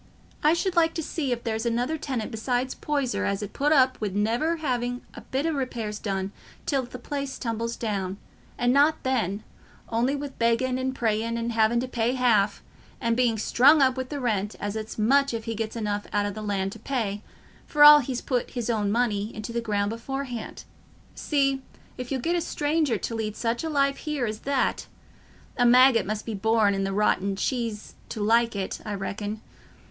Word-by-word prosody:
I 305 Hz, +2 st, +5 dB
should 370 Hz, +1 st, -1 dB
like 330 Hz, -1 st, +3 dB
to 325 Hz, -, -2 dB
see 285 Hz, -3 st, -2 dB
if 235 Hz, -1 st, -2 dB
there's 225 Hz, -1 st, -2 dB
another 245 Hz, +6 st, 0 dB
tenant 265 Hz, -7 st, -3 dB
besides 245 Hz, +3 st, -1 dB
Poyser 280 Hz, -4 st, -1 dB
as 200 Hz, +1 st, -1 dB
'ud 205 Hz, -, -7 dB
put 290 Hz, +2 st, +1 dB
up 260 Hz, -5 st, +4 dB
wi' 215 Hz, -, 0 dB
never 225 Hz, -, 0 dB
having 245 Hz, -5 st, -2 dB
a -, -, -9 dB
bit 270 Hz, +3 st, -2 dB
o' 325 Hz, -, +1 dB
repairs 235 Hz, -7 st, -3 dB
done 195 Hz, -1 st, -2 dB, 0.3 s
till 275 Hz, -3 st, +1 dB
a -, -, -7 dB
place 280 Hz, 0 st, -4 dB
tumbles 230 Hz, 0 st, -3 dB
down—and 210 Hz, +3 st, -3 dB
not 290 Hz, +3 st, +3 dB
then, 215 Hz, -6 st, -1 dB, 0.5 s
on'y 240 Hz, +5 st, +1 dB
wi' 285 Hz, 0 st, -4 dB
begging 245 Hz, +2 st, +2 dB
and 260 Hz, 0 st, -2 dB
praying 230 Hz, 0 st, 0 dB
and 235 Hz, 0 st, -2 dB
having 225 Hz, +1 st, +3 dB
to 255 Hz, -, -3 dB
pay 240 Hz, -1 st, 0 dB
half—and 230 Hz, 0 st, 0 dB
being 240 Hz, -2 st, +2 dB
strung 270 Hz, +8 st, +5 dB
up 260 Hz, -2 st, +4 dB
wi' 260 Hz, -1 st, -3 dB
the 285 Hz, +2 st, -5 dB
rent 210 Hz, -5 st, -1 dB
as 205 Hz, +1 st, -3 dB
it's 220 Hz, 0 st, -5 dB
much 270 Hz, +4 st, +3 dB
if 225 Hz, -, -4 dB
he 225 Hz, -, -3 dB
gets 220 Hz, 0 st, -4 dB
enough 210 Hz, -2 st, -2 dB
out 205 Hz, -1 st, +1 dB
o' 205 Hz, -, -1 dB
the 215 Hz, +2 st, -7 dB
land 195 Hz, -2 st, -1 dB
to 225 Hz, -, -10 dB
pay, 215 Hz, -5 st, -2 dB, 0.5 s
for 295 Hz, -1 st, +4 dB
all 295 Hz, 0 st, +11 dB
he's 255 Hz, -2 st, -3 dB
put 250 Hz, -3 st, -1 dB
his 240 Hz, -1 st, -2 dB
own 210 Hz, -3 st, 0 dB
money 215 Hz, -2 st, 0 dB
into 215 Hz, +2 st, -6 dB
the 235 Hz, -, -1 dB
ground 205 Hz, -2 st, 0 dB
beforehand. 245 Hz, 0 st, -5 dB, 0.5 s
See 275 Hz, -2 st, 0 dB, 0.4 s
if 250 Hz, +1 st, -6 dB
you'll 265 Hz, -2 st, -1 dB
get 340 Hz, +6 st, 0 dB
a 345 Hz, -, +1 dB
stranger 295 Hz, -6 st, 0 dB
to 230 Hz, -, -4 dB
lead 215 Hz, -2 st, -3 dB
such 235 Hz, +3 st, -1 dB
a 325 Hz, -, -2 dB
life 280 Hz, -2 st, +2 dB
here 300 Hz, -5 st, -2 dB
as 215 Hz, -1 st, -4 dB
that: 275 Hz, -1 st, -1 dB, 0.7 s
a 245 Hz, -, +3 dB
maggot 250 Hz, -3 st, +6 dB
must 215 Hz, 0 st, -3 dB
be 225 Hz, -, -4 dB
born 215 Hz, 0 st, +2 dB
i' 195 Hz, 0 st, -1 dB
the 195 Hz, -, -1 dB
rotten 200 Hz, -1 st, +1 dB
cheese 230 Hz, -1 st, -3 dB, 0.2 s
to -, -, -5 dB
like 230 Hz, +2 st, +3 dB
it, 195 Hz, -1 st, -3 dB
I 210 Hz, -1 st, -4 dB
reckon. 205 Hz, +2 st, -4 dB
235 Hz, 195 wpm, -26 LUFS, 215-265 Hz, 0.7 s, all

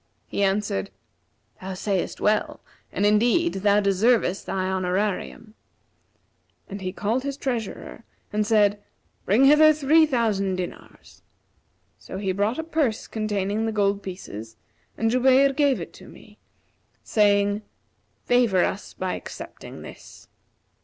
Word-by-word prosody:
He -, -, -4 dB
answered, 195 Hz, -, 0 dB, 0.7 s
'Thou 190 Hz, 0 st, -6 dB
sayest 195 Hz, -1 st, -2 dB
well, 210 Hz, 0 st, 0 dB, 0.3 s
and 205 Hz, -, 0 dB
indeed 240 Hz, +11 st, +3 dB
thou 205 Hz, 0 st, +4 dB
deservest 200 Hz, 0 st, +1 dB
thy 185 Hz, -1 st, -1 dB
honorarium;' 190 Hz, +4 st, -2 dB, 1.1 s
and 200 Hz, -1 st, -7 dB
he 185 Hz, -1 st, -3 dB
called 220 Hz, +6 st, -1 dB
his 280 Hz, 0 st, -4 dB
treasurer, 235 Hz, -4 st, -5 dB, 0.3 s
and 210 Hz, 0 st, +1 dB
said, 205 Hz, -2 st, +3 dB, 0.4 s
'Bring 230 Hz, +8 st, +4 dB
hither 300 Hz, +2 st, +7 dB
three 310 Hz, +2 st, +4 dB
thousand 215 Hz, -8 st, 0 dB
dinars.' 180 Hz, -1 st, -9 dB, 0.8 s
So -, -, -8 dB
he 195 Hz, -1 st, -1 dB
brought 205 Hz, +5 st, 0 dB
a 320 Hz, -, -2 dB
purse 295 Hz, -8 st, -1 dB
containing 215 Hz, 0 st, -2 dB
the -, -, -1 dB
gold 200 Hz, -1 st, +1 dB
pieces 115 Hz, -, -8 dB, 0.4 s
and 225 Hz, 0 st, +1 dB
Jubayr 265 Hz, +2 st, +4 dB
gave 285 Hz, -2 st, +2 dB
it -, -, -8 dB
to -, -, -13 dB
me, -, -, -16 dB, 0.6 s
saying, 205 Hz, -1 st, +2 dB, 0.6 s
'Favour 235 Hz, -7 st, +3 dB
us 200 Hz, -, -5 dB
by 185 Hz, -1 st, -3 dB
accepting -, -, -9 dB
this.' -, -, -13 dB
210 Hz, 125 wpm, -24 LUFS, 195-245 Hz, 1.1 s, hither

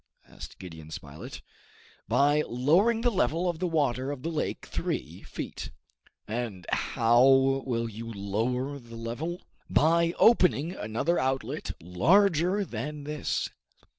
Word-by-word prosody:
asked -, -, -11 dB
Gideon 80 Hz, -4 st, -10 dB
Spilett. 75 Hz, -1 st, -9 dB, 0.6 s
"By 145 Hz, +2 st, +3 dB
lowering 175 Hz, -, +3 dB
the 240 Hz, 0 st, +2 dB
level 170 Hz, -, +1 dB
of 170 Hz, -2 st, -2 dB
the 180 Hz, -, 0 dB
water 140 Hz, -5 st, 0 dB
of 145 Hz, -3 st, -5 dB
the 165 Hz, -, -2 dB
lake 155 Hz, -, -3 dB
three 80 Hz, +8 st, -4 dB
feet." -, -, -6 dB, 0.6 s
"And 110 Hz, -5 st, -4 dB
how 120 Hz, +2 st, +3 dB
will 135 Hz, -3 st, +3 dB
you 115 Hz, +1 st, -7 dB
lower 120 Hz, +7 st, -2 dB
the 115 Hz, -2 st, -12 dB
level?" 135 Hz, +11 st, -5 dB, 0.3 s
"By 170 Hz, +2 st, +3 dB
opening 180 Hz, -, +4 dB
another 115 Hz, -, -1 dB
outlet 130 Hz, 0 st, -2 dB
larger 175 Hz, -, +3 dB
than 145 Hz, +3 st, -5 dB
this." 150 Hz, 0 st, -2 dB
135 Hz, 125 wpm, -28 LUFS, 115-165 Hz, 0.6 s, opening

